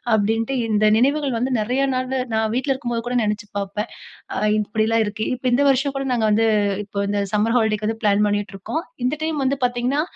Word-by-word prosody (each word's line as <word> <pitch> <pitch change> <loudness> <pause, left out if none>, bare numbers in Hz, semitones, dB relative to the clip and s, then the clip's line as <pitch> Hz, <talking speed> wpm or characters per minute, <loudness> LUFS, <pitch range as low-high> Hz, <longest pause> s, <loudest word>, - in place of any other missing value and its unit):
அப்டீன்ட்டு 225 +4 0 0.2
இந்த 215 0 +3
நினைவுகள் 280 -1 +1
வந்து 255 +3 -1
நெறைய 250 +5 0
நாளு 255 +1 -1 0.2
நான் 220 0 +1
வீட்ல 270 +1 0
இருக்கும்போது 240 -3 -3
கூட 250 - -2
நெனைச்சு 210 0 -2
பாப்பேன். 200 +3 -4 0.7
இப்படிலாம் 220 +2 +1
இருக்கு. 210 +1 -3
இப்போ, 255 +1 -7
இந்த 265 - +3
வருஷம் 275 +1 +2
கூட 275 - -2
நாங்க 235 -3 +1
வந்து 220 +2 +3 0.4
இப்போ 200 0 -6
இந்த 205 0 0
சம்மர் 215 +2 +1
ஹாலிடேக்கு 215 -2 +1
வந்து 225 +1 -1
ப்ளான் 205 -1 +3
பண்ணிட்டு 205 -1 -1
இருக்கோம். 315 - -4 0.2
இந்த 255 +4 +1
டைம் 315 -1 -1
வந்து 270 +2 +1
பாத்தீங்கன்னா, 250 +3 +1
225 Hz, 190 wpm, -21 LUFS, 210-260 Hz, 0.7 s, இந்த